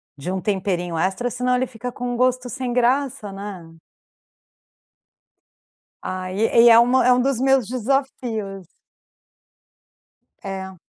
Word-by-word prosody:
de 145 +5 -5
um 190 - -2
temperinho 185 -3 -2
extra, 190 +9 -1
senão 250 +1 0
ele 255 +1 +1
fica 245 0 -7
com 245 +1 -5
um - - -3
gosto 255 0 +1
sem 250 0 -4
graça, 255 -1 0
né? 195 -4 -8 2.3
Ah, 185 0 -5
e 205 +4 0 0.2
e - - +9
é 230 0 +8
uma 250 +2 +4
é 250 - +5
um 250 - +2
dos 265 -1 0
meus 265 -4 +3
desafios. 235 - -3 1.8
É. 190 -2 -6
235 Hz, 130 wpm, -22 LUFS, 190-250 Hz, 2.3 s, e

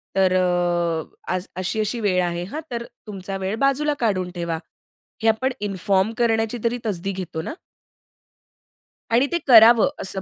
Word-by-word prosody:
तर 190 -1 +3
अ, 175 -1 0 0.2
अशी-अशी 215 +5 -1
वेळ 185 -4 +1
आहे, 175 0 -2
हां 295 - -6
तर 235 0 -3 0.2
तुमचा 195 -1 -5
वेळ 190 +2 -2
बाजूला 295 +2 +1
काढून 185 -6 0
ठेवा. 170 -2 -2 0.7
हे - - +3
आपण 255 +4 +1
इन्फॉर्म 195 0 +1
करण्याची 225 0 +1
तरी 235 +1 0
तसदी 195 -2 -2
घेतो 185 -4 -5
ना. 170 - -5 1.6
आणि 250 +4 +4
ते 345 - +2
करावं 230 -2 +8
असं 190 0 -3
195 Hz, 140 wpm, -22 LUFS, 180-230 Hz, 1.6 s, करावं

